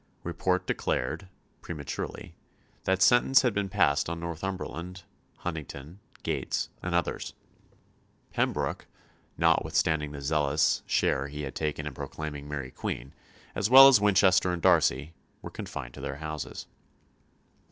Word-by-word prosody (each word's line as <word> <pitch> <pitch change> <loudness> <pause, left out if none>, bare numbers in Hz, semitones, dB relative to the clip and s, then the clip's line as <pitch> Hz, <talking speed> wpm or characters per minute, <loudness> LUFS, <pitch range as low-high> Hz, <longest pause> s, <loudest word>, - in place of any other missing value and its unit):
Report 90 +2 -1
declared 80 +9 -2 0.3
prematurely 70 -5 -6 0.5
that 95 0 +3
sentence 120 +5 +5
had 125 -4 +2
been 100 -1 -1
passed 80 -7 +2
on 85 0 -4
Northumberland, 90 +1 -5 0.3
Huntingdon, 80 0 -7 0.2
Gates, - - -2
and 90 -1 -2
others. 85 - -2 1.0
Pembroke, - - -1 0.5
notwithstanding 75 -2 +2
the 70 -1 -7
zealous 75 +1 +2
share 70 +1 +1
he 75 +1 -6
had 70 - -5
taken 75 -1 -3
in 75 - -5
proclaiming 75 -2 -6
Mary 70 -3 -5
Queen, 65 +3 -5 0.4
as 100 - 0
well 135 +2 +11
as 130 -7 +6
Winchester 95 -2 +4
and 90 -1 -4
Darcy, 75 +6 +3 0.3
were - - -7
confined - - -7
to - - -10
their 65 - -4
houses. 75 +1 -6
80 Hz, 125 wpm, -28 LUFS, 75-95 Hz, 1.0 s, well